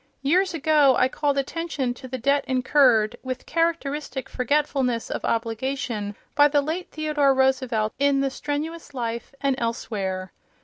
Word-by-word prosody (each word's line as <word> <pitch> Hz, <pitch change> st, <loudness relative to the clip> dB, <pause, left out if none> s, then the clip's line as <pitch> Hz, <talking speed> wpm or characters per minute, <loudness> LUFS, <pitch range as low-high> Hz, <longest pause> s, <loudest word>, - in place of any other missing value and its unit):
Years 360 Hz, +5 st, +2 dB
ago 300 Hz, -3 st, +4 dB
I 255 Hz, -, +4 dB
called 285 Hz, +1 st, -1 dB
attention 275 Hz, -3 st, -2 dB
to 260 Hz, -, -10 dB
the 260 Hz, +1 st, -4 dB
debt 280 Hz, +4 st, +2 dB
incurred 250 Hz, -4 st, +3 dB
with 260 Hz, -1 st, -5 dB
characteristic 305 Hz, -5 st, -1 dB
forgetfulness 255 Hz, -2 st, 0 dB
of -, -, -3 dB
obligation 230 Hz, -2 st, -2 dB, 0.2 s
by 290 Hz, 0 st, +6 dB
the 290 Hz, 0 st, +2 dB
late 330 Hz, +5 st, -3 dB
Theodore 300 Hz, -3 st, +1 dB
Roosevelt, 260 Hz, -5 st, +1 dB
in 280 Hz, -1 st, +3 dB
"The 275 Hz, -1 st, 0 dB
Strenuous 295 Hz, +2 st, -5 dB
Life" 235 Hz, +2 st, -4 dB
and 275 Hz, -1 st, +2 dB
elsewhere. 195 Hz, -5 st, -3 dB
270 Hz, 140 wpm, -24 LUFS, 240-295 Hz, 0.2 s, by